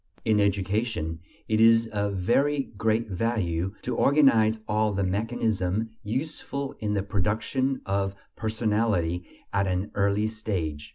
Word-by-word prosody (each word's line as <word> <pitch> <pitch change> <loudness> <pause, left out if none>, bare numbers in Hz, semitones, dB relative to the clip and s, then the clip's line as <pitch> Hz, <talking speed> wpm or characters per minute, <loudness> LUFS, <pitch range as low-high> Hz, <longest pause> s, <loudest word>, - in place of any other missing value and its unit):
In 110 -2 +3
education, 100 -4 0 0.3
it 110 0 +2
is 115 0 +6
of 105 -2 -2
very 135 +9 +1
great 110 +2 +1
value 95 -3 -1
to - - -2
organize 115 -7 +4
all 105 0 +1
the 100 0 0
mechanism 105 0 -1
useful 140 +4 -3
in 105 -1 -1
the 100 - 0
production 110 +7 -1
of 100 0 -1 0.2
personality 105 -6 0 0.3
at 100 0 +2
an 90 +2 -1
early 100 +1 +1
stage. 95 -9 -3
105 Hz, 125 wpm, -26 LUFS, 95-115 Hz, 0.3 s, is